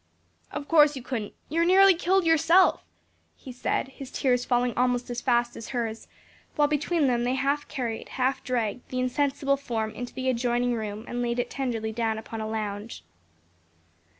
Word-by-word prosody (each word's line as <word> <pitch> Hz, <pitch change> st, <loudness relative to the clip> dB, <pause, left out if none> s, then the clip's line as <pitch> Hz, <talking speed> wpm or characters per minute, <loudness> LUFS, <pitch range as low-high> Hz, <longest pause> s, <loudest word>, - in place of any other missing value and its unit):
"Of 285 Hz, -, -5 dB
course 300 Hz, -3 st, +5 dB
you 260 Hz, -, -7 dB
couldn't; 230 Hz, -5 st, -4 dB
you 325 Hz, +3 st, 0 dB
are -, -, +4 dB
nearly 380 Hz, +2 st, +7 dB
killed 360 Hz, +2 st, +1 dB
yourself," 330 Hz, +3 st, +4 dB, 0.5 s
he 260 Hz, -, -10 dB
said, 250 Hz, +2 st, -2 dB
his 270 Hz, -1 st, -10 dB
tears 250 Hz, -2 st, +1 dB
falling 245 Hz, -1 st, +1 dB
almost 245 Hz, 0 st, 0 dB
as 240 Hz, -, -3 dB
fast 240 Hz, -2 st, +1 dB
as 225 Hz, -, -8 dB
hers, 230 Hz, -3 st, -4 dB, 0.5 s
while 295 Hz, -1 st, +4 dB
between 305 Hz, +2 st, +1 dB
them 240 Hz, -2 st, +1 dB
they 250 Hz, +2 st, 0 dB
half 280 Hz, +2 st, 0 dB
carried, 240 Hz, -6 st, -4 dB
half 260 Hz, +1 st, -1 dB
dragged 240 Hz, -2 st, -2 dB
the 255 Hz, -, -3 dB
insensible 275 Hz, +2 st, +1 dB
form 225 Hz, -5 st, -3 dB
into 245 Hz, +3 st, -7 dB
the 260 Hz, 0 st, -3 dB
adjoining 245 Hz, 0 st, +1 dB
room 215 Hz, -1 st, -4 dB
and 245 Hz, 0 st, -3 dB
laid 240 Hz, 0 st, -1 dB
it 245 Hz, 0 st, -2 dB
tenderly 230 Hz, -5 st, -2 dB
down 225 Hz, -1 st, -1 dB
upon 220 Hz, 0 st, -6 dB
a 215 Hz, -, -4 dB
lounge. 215 Hz, 0 st, -5 dB
250 Hz, 180 wpm, -26 LUFS, 235-280 Hz, 0.5 s, nearly